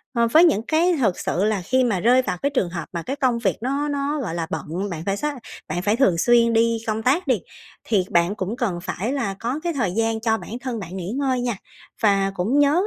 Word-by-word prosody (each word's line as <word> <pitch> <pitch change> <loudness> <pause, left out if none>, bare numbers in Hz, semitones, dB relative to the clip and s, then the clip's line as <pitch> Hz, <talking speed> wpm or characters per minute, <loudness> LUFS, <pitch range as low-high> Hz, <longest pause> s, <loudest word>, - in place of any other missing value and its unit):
Ờ, 235 0 +3
với 320 +6 +7
những 295 - +3
cái 335 +3 +3
thực 210 -8 +1
sự 180 - -1
là 210 -2 +1
khi 255 +8 +2
mà 220 -7 +1
rơi 245 +7 +4
vào 215 - -3
cái 280 - +1
trường 255 -11 0
hợp 170 -2 -5
mà 170 -1 -3
cái 270 - -3
công 255 -4 +1
việc 200 -5 0
nó 275 +4 -1
nó, 285 +1 -1
gọi 195 -10 -4
là, 165 -1 -2
bận, 165 +6 -4
bạn 165 -3 -5
phải 195 0 0
sát 295 +5 -2 0.3
bạn 170 +3 -2
phải 205 +3 +1
thường 230 -9 +3
xuyên 235 +4 +4
đi 230 0 +3
công 220 0 -1
tác 280 +9 +2
đi, 250 -6 +2 0.4
thì 200 -5 +1
bạn 170 +4 +2
cũng 195 +2 -3
cần 205 -9 -1
phải 195 +6 -3
là 235 -9 -2
có 245 +6 -2
cái 345 -1 -1
thời 240 - 0
gian 225 +1 0
cho 225 -1 +1
bản - - -10
thân 245 -3 -4
bạn 185 -1 -7
nghỉ 185 +1 -4
ngơi 260 -1 0
nha. 240 -4 -2 0.5
Và 195 -2 +3
cũng 215 +11 +1
nhớ 285 0 +4
225 Hz, 250 wpm, -22 LUFS, 190-260 Hz, 0.5 s, với